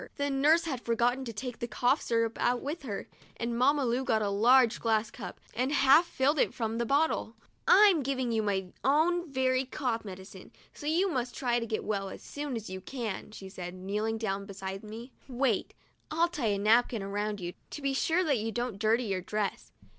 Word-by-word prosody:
The 285 -1 -1
nurse 300 +5 +4
had 275 -7 -3
forgotten 240 +3 +1
to 235 - -4
take 245 +2 -6
the 235 - -3
cough 245 +5 +1
syrup 230 -1 0
out 245 0 +2
with 300 +5 -4
her, 215 -8 -5 0.3
and 235 0 -2
Mamma 275 +3 +3
Lu 245 +2 0
got 220 -4 +1
a 200 - 0
large 235 +3 +5
glass 225 0 +1
cup - - -8
and 255 +4 0
half 290 +4 +5
filled 290 0 +1
it - - +1
from 225 -1 -2
the 235 - -1
bottle. 280 -5 +1 0.3
'I'm 395 -6 +7
giving 260 -2 -1
you 225 -1 +1
my 190 -3 -2
own 320 +4 +2
very 260 -1 +2
cough 250 -3 -2
medicine, 190 -1 -10 0.2
so 295 - -8
you 345 +6 +2
must 250 -4 -2
try 240 -3 +1
to 230 - -4
get 215 - -2
well 195 -2 -2
as - - -10
soon 290 -3 -5
as 220 -2 -5
you 185 0 -6
can," 230 -1 -5
she 195 -2 -9
said, 180 -2 -7
kneeling 210 +4 -2
down 200 -3 -3
beside 195 0 -6
me. 225 +4 -9
' - - -30
Wait; 250 -4 0 0.3
I'll 330 +2 +2
tie 295 -9 -2
a 205 -1 +1
napkin 220 +1 +3
around 205 +1 -2
you, 175 -1 -5 0.2
to 295 - -7
be 275 -1 +1
sure 330 +6 +2
that 285 -8 +1
you 225 +1 -2
don't 240 -3 -3
dirty 225 +3 +2
your 195 -4 -2
dress. 205 +2 -3
235 Hz, 210 wpm, -30 LUFS, 210-270 Hz, 0.3 s, I'm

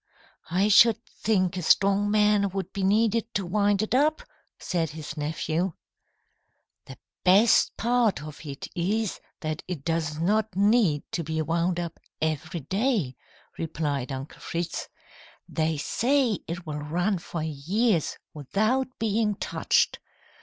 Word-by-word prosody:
"I 185 +5 +2
should 215 +1 +7
think 185 -4 0
a - - -2
strong 200 +4 +3
man 210 -1 +3
would 195 0 -5
be 195 0 -2
needed 225 +3 +2
to 195 - 0
wind 205 +2 +2
it 215 - -3
up," 300 +4 +2 0.3
said 165 -3 -1
his 155 0 -7
nephew. 160 +3 -1 1.1
"The 130 - -10 0.3
best 200 +5 +5
part 230 -8 +1
of 150 0 -9
it 140 -2 -7
is 200 +4 -1 0.2
that 155 -1 -3
it 170 -7 -5
does 165 -2 -1
not 210 +6 +1
need 200 -7 +3
to 170 - -2
be 160 +1 -3
wound 170 +2 0 0.4
every 160 +1 -2
day," 195 - 0 0.4
replied 145 -5 -2
Uncle 135 +2 -7
Fritz. 170 0 -3 0.6
"They 160 -1 -1
say 245 - +1
it 170 +1 -5
will 150 -1 -4
run 175 +6 0
for 165 -1 -5
years 165 - 0 0.2
without 215 - 0
being 215 -1 +1
touched. - - +1
180 Hz, 130 wpm, -26 LUFS, 160-215 Hz, 1.1 s, should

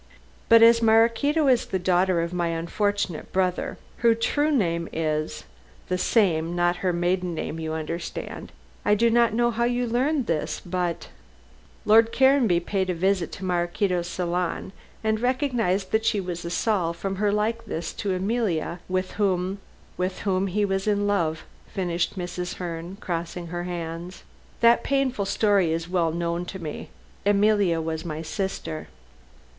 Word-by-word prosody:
"But 230 0 +8
as 230 0 +7
Maraquito 230 +7 +3
is 250 -3 +3
the 190 - -1
daughter 180 -1 +2
of 170 +1 -4
my 175 -1 0
unfortunate 170 +2 -2
brother, 185 -1 0 0.2
her 230 -1 +4
true 290 +6 +1
name 170 - 0
is 155 -1 -2 0.5
the 180 - +1
same 175 -6 +2
not 175 0 +2
her 185 - 0
maiden 175 0 0
name, 160 0 -4
you 160 -1 -3
understand. 165 +2 -5 0.3
I 210 - +4
do 230 +2 +3
not 235 -1 +3
know 240 0 +2
how 235 +1 0
you 245 0 0
learned 260 +4 +1
this, 160 -6 -1
but 175 -1 -3 0.4
" - - -29
"Lord 225 +2 +6
Caranby 265 -10 +4
paid 190 +1 -1
a 180 - 0
visit 185 0 +1
to 190 - -6
Maraquito's 175 0 0
salon 180 +1 -2 0.3
and 220 0 +1
recognized 245 -7 0
that 220 0 +2
she 215 -2 +2
was 180 -2 -4
a 170 - -4
Saul 175 -2 0
from 195 +3 -4
her 205 +1 +2
likeness 210 -6 -2
to 195 -2 -2
Emilia, 185 -4 -1
with 185 0 -1
whom 190 0 0 0.2
" - - -29
"With 185 +1 -2
whom 195 -1 0
he 205 +3 +1
was 195 0 -1
in 205 -1 +2
love," 170 -6 0 0.3
finished 180 0 -1
Mrs. 180 0 -4
Herne, 175 +1 -6
crossing 170 -1 -4
her 175 +1 -4
hands; 170 0 -6 0.4
"that 235 0 +5
painful 265 -7 0
story 200 -4 +2
is 165 +1 -2
well 175 -2 +1
known 170 +1 -2
to 190 - -6
me. 160 -5 -6 0.3
Emilia 205 -4 +3
was 160 0 -3
my 160 -2 -5
sister." 165 -3 -4
185 Hz, 160 wpm, -25 LUFS, 170-215 Hz, 0.5 s, But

